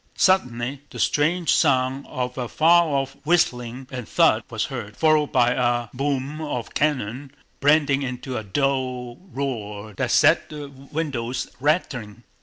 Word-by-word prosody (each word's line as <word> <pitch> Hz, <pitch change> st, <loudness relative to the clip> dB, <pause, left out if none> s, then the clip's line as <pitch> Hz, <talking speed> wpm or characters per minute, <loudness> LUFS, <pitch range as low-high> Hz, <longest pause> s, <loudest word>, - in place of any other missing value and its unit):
Suddenly 130 Hz, -7 st, +1 dB
the -, -, -10 dB
strange 165 Hz, +4 st, +2 dB
sound 135 Hz, -2 st, +2 dB
of 125 Hz, -1 st, -4 dB
a 125 Hz, -2 st, -3 dB
far 170 Hz, +6 st, +5 dB
off 135 Hz, -2 st, -1 dB
whistling 130 Hz, -6 st, 0 dB
and 125 Hz, -4 st, -6 dB
thud 160 Hz, -10 st, +4 dB
was 110 Hz, -2 st, -1 dB
heard, 115 Hz, -6 st, -7 dB
followed 155 Hz, -2 st, +3 dB
by 125 Hz, -2 st, +4 dB
a 120 Hz, -2 st, 0 dB
boom 140 Hz, +2 st, -2 dB
of 135 Hz, -6 st, -4 dB
cannon 135 Hz, -2 st, -1 dB, 0.3 s
blending 145 Hz, -1 st, +3 dB
into 130 Hz, -1 st, -4 dB
a 110 Hz, -, -3 dB
dull 125 Hz, +1 st, -1 dB
roar 110 Hz, -6 st, -4 dB
that -, -, -2 dB
set -, -, +4 dB
the 150 Hz, -2 st, -7 dB
windows 135 Hz, -3 st, -4 dB
rattling. 125 Hz, -, -1 dB
130 Hz, 140 wpm, -23 LUFS, 120-145 Hz, 0.3 s, far